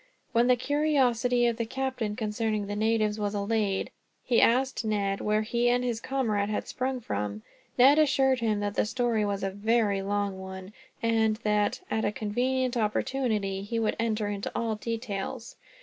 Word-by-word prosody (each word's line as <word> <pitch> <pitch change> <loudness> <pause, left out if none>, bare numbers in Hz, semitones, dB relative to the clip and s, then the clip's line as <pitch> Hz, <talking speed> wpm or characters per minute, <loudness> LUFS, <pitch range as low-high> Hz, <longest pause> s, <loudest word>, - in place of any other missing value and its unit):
When 240 0 +3
the 250 - +5
curiosity 250 -4 +2
of 235 -1 +1
the 230 - -1
captain 260 -4 -2
concerning 215 -1 -1
the 205 +1 -4
natives 215 0 +1
was 205 0 -2
allayed, 205 -1 0 0.3
he 240 - +3
asked 260 +3 +2
Ned 200 -2 -1
where 210 +1 +1
he 240 +2 +1
and 245 +1 +2
his 235 -2 -2
comrade 220 -7 0
had 215 - -2
sprung 255 0 -2
from. 105 - -4 0.3
Ned 275 +4 +7
assured 270 -3 +3
him 215 -3 0
that 205 0 -2
the - - +1
story 240 -2 0
was 200 -1 -2
a 195 - -1
very 205 0 +1
long 200 -1 -2
one; 190 +1 -8 0.3
and 225 -1 +2
that, 210 - +1
at 220 - 0
a 205 - +1
convenient 250 +4 -1
opportunity, 215 -3 -1
he 205 +4 -4
would 225 -1 +1
enter 220 -2 0
into 205 -1 -3
all 230 -1 0
details. 225 +1 -5
220 Hz, 170 wpm, -28 LUFS, 205-245 Hz, 0.3 s, Ned